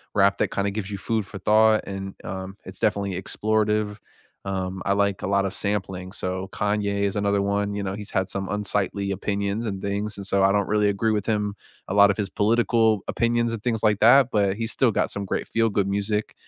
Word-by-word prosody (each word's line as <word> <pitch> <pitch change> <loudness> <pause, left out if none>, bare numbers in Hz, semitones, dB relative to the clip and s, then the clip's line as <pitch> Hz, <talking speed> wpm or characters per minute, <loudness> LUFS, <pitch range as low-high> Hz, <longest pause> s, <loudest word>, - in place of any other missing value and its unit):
rap 100 0 +4
that - - +1
kinda 100 0 -1
gives 105 -1 -4
you 100 - -4
food 110 +1 -1
for 100 - -8
thought 110 +2 +4
and, 95 0 -6
um, 95 +1 -6
it's - - -9
definitely 100 -2 0
explorative, 105 0 0 0.5
um, 95 -1 -3
I 100 - +2
like 100 -1 +1
a - - -3
lot 100 0 +2
of 95 - -3
sampling, 95 -2 -3
so 95 +1 -3
Kanye 100 -1 0
is 100 0 0
another 100 0 +1
one, 100 +1 0
you 100 - -3
know, 95 0 -3
he's 105 -1 -8
had 95 -1 0
some 95 0 -4
unsightly 100 0 -2
opinions 100 +3 -2
and 95 -3 -4
things, 100 +1 -2
and 100 - -7
so 100 0 +2
I 95 +1 +4
don't 100 -1 +1
really 105 0 +3
agree 100 +3 +1
with 105 -2 -1
him, 105 -2 -1 0.3
a 95 - -1
lot 100 0 +6
of 95 - -4
his 100 -2 -2
political 110 0 +2
opinions 115 0 +1
and 115 - -4
things 115 -2 -1
like 105 -2 +3
that, 130 +3 +6
but 100 -2 +2
he's 115 +1 -3
still 125 -3 +2
got - - 0
some 100 0 -3
great - - -3
feel-good 105 -4 +1
music, 100 +2 -1
100 Hz, 220 wpm, -24 LUFS, 100-105 Hz, 0.5 s, lot